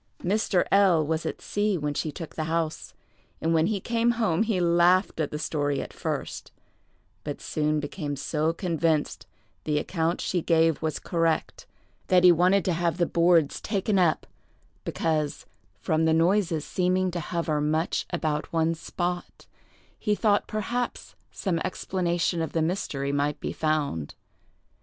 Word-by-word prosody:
Mr. 195 -1 +1
L—— 185 -6 +5
was 160 +1 -1
at - - -5
sea 205 -2 0
when 150 -2 -2
she 155 +1 -2
took 165 +2 -8
the 155 - -3
house, 160 0 -2 0.4
and 165 +1 0
when 160 0 +3
he 210 -1 -1
came 235 +3 +1
home 210 -7 +1
he 220 -4 +1
laughed 175 +2 +3
at 155 - 0
the 150 - -4
story 145 -2 -1
at - - -6
first, - - -4 0.7
but - - -5
soon 155 0 0
became 145 0 -4
so 155 +3 0
convinced 165 -3 -1 0.4
the 150 -1 0
account 165 +2 -1
she 180 - -1
gave 165 -1 +2
was 160 -1 -1
correct, 165 -2 -1 0.4
that 180 -2 +4
he 180 - +9
wanted 180 +3 +3
to 180 - +1
have 170 +1 0
the 175 - +2
boards 170 -3 +3
taken 200 -1 0
up, 170 -4 +2 0.6
because, 155 -3 -1 0.3
from 160 +9 +1
the 160 - +3
noises 165 -1 +2
seeming 185 0 +1
to 175 - -3
hover 160 -2 -1
much 155 +3 0
about 155 -4 -2
one 165 0 +2
spot, 175 +2 -4 0.5
he 210 -1 +1
thought 205 -1 +2
perhaps 240 +3 -3 0.2
some 180 -5 -1
explanation 175 -1 -1
of 160 - -3
the 165 - +1
mystery 150 -5 -2
might 145 +1 0
be - - -4
found. 145 - -1
165 Hz, 155 wpm, -26 LUFS, 155-185 Hz, 0.7 s, he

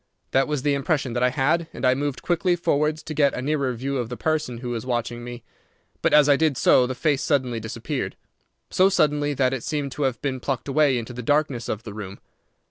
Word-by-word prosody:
That 135 +1 +3
was 150 -3 -2
the 145 - +2
impression 140 -2 -1
that 120 - -1
I 125 - +4
had, 150 +6 +1
and - - -3
I 125 - +5
moved 140 0 -3
quickly 175 +1 +1
forwards 155 -2 0
to 155 - -6
get 145 -2 +2
a - - -3
nearer 140 -2 0
view 135 +4 -3
of 120 -2 -3
the 125 - -6
person 155 -6 -1
who 120 0 -5
was 115 -2 -3
watching 120 -1 -3
me. 120 -1 -8 0.6
But - - +2
as 150 -1 +6
I 145 - +6
did 155 -2 +1
so 125 - +4
the 130 - -4
face 145 +1 +1
suddenly 130 -7 0
disappeared, 110 0 -4 0.6
so 185 +1 +4
suddenly 150 -5 +1
that 130 -1 +2
it 130 - -3
seemed 145 -3 -2
to 150 - -6
have 130 -4 0
been 135 -2 -2
plucked 130 -1 -3
away 140 -2 +3
into 120 +1 -5
the 125 - -6
darkness 140 -2 0
of 110 +1 -3
the 110 - -8
room. 100 -2 -8
135 Hz, 230 wpm, -24 LUFS, 125-150 Hz, 0.6 s, as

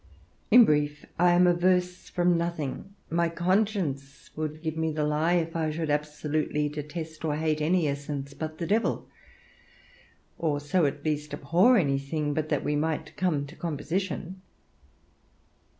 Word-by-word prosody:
In 240 +1 +9
brief, 145 -2 0
I 175 +1 +5
am 180 +1 +5
averse 180 +1 +1
from 175 0 +2
nothing: 170 +2 -3 0.2
my 170 0 +2
conscience 175 -6 -1
would 155 0 -4
give 160 -1 -2
me 160 0 0
the 150 0 -1
lie 150 +3 +1
if 165 -1 0
I 160 -1 0
should 155 0 -2
absolutely 150 0 -1
detest 155 +2 -6
or 155 -2 0
hate 155 0 0
any 165 +1 +2
essence 140 0 -4
but 155 +2 -5
the 170 - -3
Devil; 215 +7 0 1.3
or 150 -3 0
so 145 +2 +2
at 140 +2 -5
least 150 -1 -2
abhor 175 - +4
anything 145 -1 0
but 155 +1 -2
that 150 - 0
we 150 - 0
might 155 +1 -2
come 155 -6 0
to 145 +4 -12
composition. 175 +3 -3
155 Hz, 150 wpm, -27 LUFS, 150-175 Hz, 1.3 s, In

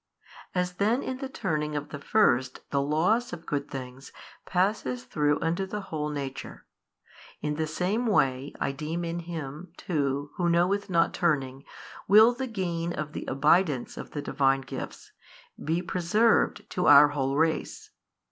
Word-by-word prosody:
As 180 0 0
then 225 +6 +1
in 260 - -4
the 270 0 -5
turning 150 - -2
of 145 0 -4
the 145 - -7
first 130 - +2
the 140 - +2
loss 180 - +1
of 165 - -8
good 140 -1 -3
things 130 0 -8 0.4
passes 180 - 0
through 145 +2 +1
unto 170 +4 -1
the 210 +2 -4
whole 150 -1 -1
nature: 140 -3 -6 0.7
in 150 0 -2
the 155 +1 -2
same 190 +10 -1
way 135 - +1
I - - 0
deem 155 +5 -4
in 170 +1 -3
Him 165 0 -7
too 145 -3 -2
Who 175 -1 +1
knoweth 185 +4 +1
not 170 -2 +2
turning 135 -5 -1 0.4
will 220 +4 +7
the 260 +2 -4
gain 175 -6 -2
of 155 -1 -5
the - - -5
abidance 150 0 +2
of - - -8
the 145 - -5
Divine 135 -1 +2
Gifts 135 - -8 0.5
be 165 +4 0
preserved 190 +6 +2
to 180 - 0
our 145 +1 +9
whole 135 -2 -1
race. 160 0 -1
160 Hz, 155 wpm, -27 LUFS, 140-185 Hz, 0.7 s, our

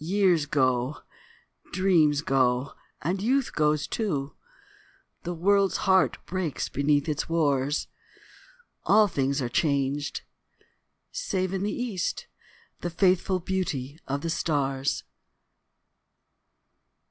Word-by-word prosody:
Years 180 -3 +2
go, 130 -1 +1 0.7
dreams 170 -6 +3
go, 130 -1 +1 0.3
and 185 +5 -1
youth 260 +5 +1
goes 150 -1 +2
too, 150 -11 -2 0.9
The 175 - -4
world's 195 +3 +3
heart 190 -1 +4
breaks 180 -5 -3
beneath 145 +1 +1
its 150 0 -2
wars, 145 -3 +1 1.0
All 210 +1 +5
things 140 -5 0
are - - -1
changed, 140 0 0 0.9
save 190 - -2
in 190 - -1
the 205 +1 -1
east 225 -8 -3 0.5
The 175 - -3
faithful 185 +1 +2
beauty 165 -6 -3
of 140 +1 -2
the 165 - -2
stars. 140 -4 -1
160 Hz, 100 wpm, -27 LUFS, 140-190 Hz, 1.0 s, All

